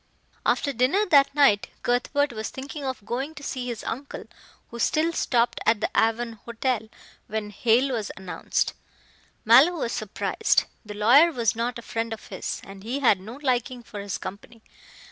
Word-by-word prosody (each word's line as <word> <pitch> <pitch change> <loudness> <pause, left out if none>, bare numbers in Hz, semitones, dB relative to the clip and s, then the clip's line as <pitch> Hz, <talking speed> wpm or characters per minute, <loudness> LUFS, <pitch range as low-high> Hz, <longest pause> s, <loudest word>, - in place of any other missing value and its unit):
After 280 - +1
dinner 270 - +2
that 280 -1 +5
night, 270 -9 +4 0.2
Cuthbert 250 +3 +1
was 220 -1 -4
thinking 280 +2 -7
of 260 -6 -4
going 270 +7 -3
to 285 - -10
see 255 -3 -4
his 235 -3 -5
uncle, 275 +4 -5 0.5
who 235 - -7
still 315 +6 +1
stopped 240 -6 +1
at 225 -1 +3
the - - -1
Avon 225 0 +1
Hotel. 235 -1 -1 0.4
When 215 -1 -4
Hale 240 +5 +2
was 220 -4 -2
announced. 190 -1 -2 0.7
Mallow 260 +10 +7
was 280 -9 -2
surprised. 215 -1 0 0.2
The 210 -2 -8
lawyer 255 +11 +6
was 235 -7 0
not 235 +2 -2
a 235 - -9
friend 225 0 -3
of 220 - -10
his, 190 - -4
and 195 0 -11
he 245 +7 -3
had 220 -7 +4
no 215 +6 -9
liking 250 -1 -1
for 210 - -9
his 200 -1 -4
company. 220 +4 -9
235 Hz, 170 wpm, -25 LUFS, 220-270 Hz, 0.7 s, Mallow